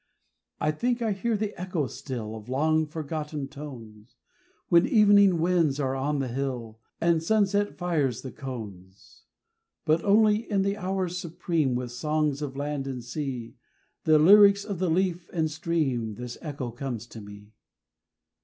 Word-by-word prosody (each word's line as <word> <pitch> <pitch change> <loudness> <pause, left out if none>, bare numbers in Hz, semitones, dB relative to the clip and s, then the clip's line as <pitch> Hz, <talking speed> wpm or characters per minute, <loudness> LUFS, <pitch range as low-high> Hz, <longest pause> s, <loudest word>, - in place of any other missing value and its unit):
I 155 - +1
think 240 +9 -1
I 220 - +1
hear 215 +3 -1
the 210 0 -2
echo 180 -5 -1
still 125 -5 -6
Of 110 +1 -10
long 155 +4 +2
forgotten 150 -2 -4
tones, 120 -6 -11 0.5
When 170 0 +5
evening 205 -4 +5
winds 165 -4 +2
are 135 -2 0
on 145 +2 -1
the 135 -2 -1
hill 120 -3 -4 0.2
And 170 -1 +2
sunset 205 +2 +1
fires 155 -9 -1
the 130 - -6
cones; 105 -8 -9 0.6
But 160 +2 +2
only 210 +2 +3
in 200 -2 +2
the 200 +1 0
hours 185 -2 -2
supreme, 165 -5 -1
With 125 -1 -3
songs 150 +2 -1
of 135 -2 -5
land 145 -1 -3
and 125 -3 -5
sea, 125 -3 -5 0.5
The 155 -1 +6
lyrics 200 +5 +7
of 200 -5 -4
the 185 -2 +1
leaf 180 0 0
and 160 -3 0
stream, 150 -9 -1
This 120 +1 -7
echo 140 -6 -5
comes 120 -2 -5
to 115 -2 -11
me. 105 +1 -12
150 Hz, 155 wpm, -27 LUFS, 125-180 Hz, 0.6 s, lyrics